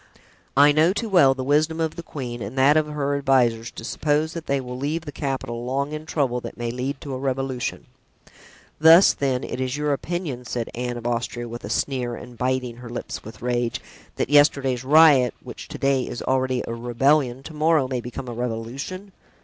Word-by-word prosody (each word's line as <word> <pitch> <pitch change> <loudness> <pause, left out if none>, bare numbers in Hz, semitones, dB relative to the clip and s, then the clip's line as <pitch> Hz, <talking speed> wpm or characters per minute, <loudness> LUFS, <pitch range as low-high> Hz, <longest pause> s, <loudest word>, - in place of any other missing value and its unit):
I 145 +1 +7
know 155 +5 +4
too 225 +2 -3
well 140 -9 +5
the 130 - -4
wisdom 155 +4 +1
of 160 -1 -1
the - - -6
queen 125 -7 -6
and 110 +6 -6
that 135 +3 +5
of 155 -1 +2
her 145 -2 -2
advisers 125 -5 +2
to - - -10
suppose 155 +6 0
that 165 -2 -7
they 140 0 +1
will 125 -1 -6
leave 145 +6 -2
the 145 - -6
capital 130 -5 -4
long 135 +3 -2
in 155 +1 -6
trouble 130 -6 0
that - - -8
may 120 -1 -3
lead 130 +3 -3
to 140 - -6
a 130 - -4
revolution." 135 -1 -3 0.9
"Thus, 165 +4 +8
then, 130 -2 -1
it 125 - -4
is 130 +2 -2
your 150 -1 0
opinion," 155 -4 -4
said 115 -1 -4
Anne 120 0 -3
of 120 - -9
Austria, 120 0 -2
with 120 +1 -8
a - - -6
sneer 125 0 -1
and 125 0 -11
biting 125 -1 -1
her 120 -1 -10
lips 120 - -6
with 110 +1 -11
rage, 120 -1 -1 0.4
"that - - -2
yesterday's 140 -4 +4
riot, 140 -3 +6
which - - -9
to - - -7
day 135 -2 +1
is 120 - -5
already 130 -1 0
a 115 - -3
rebellion, 125 +2 +1
to 160 - -9
morrow 155 -2 +2
may 130 -2 -2
become 125 +2 -7
a 120 - -5
revolution?" 125 - -5
130 Hz, 205 wpm, -23 LUFS, 120-150 Hz, 0.9 s, Thus